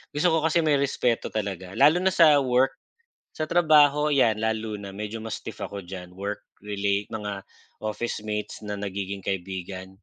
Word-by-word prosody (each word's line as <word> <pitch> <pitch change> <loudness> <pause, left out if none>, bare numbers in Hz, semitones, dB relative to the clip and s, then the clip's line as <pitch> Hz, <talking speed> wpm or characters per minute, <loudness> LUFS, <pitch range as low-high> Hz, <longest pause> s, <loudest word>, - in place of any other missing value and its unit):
gusto 165 +3 +3
ko 160 - +3
kasi 165 +1 +2
may 150 -3 +3
respeto 125 -4 0
talaga, 95 -3 -4
lalo 160 +4 +6
na 185 0 +1
sa 155 -4 +7
work, 130 0 +2 0.5
sa 155 - -3
trabaho 150 -3 +5
'yan 115 -6 +3
lalo 110 -1 -1
na 100 -1 -7
medyo 105 +3 -6
mas 115 - -4
stiff - - -8
ako 100 -3 -6
diyan 90 -1 -8
work 100 +2 -4 0.2
relate, 100 0 -1
mga 105 -3 -5 0.4
office 110 0 -3
mates 105 0 -3
na 105 - -3
nagiging 100 -1 -4
kaibigan. 95 +1 -5
105 Hz, 170 wpm, -26 LUFS, 100-140 Hz, 0.5 s, sa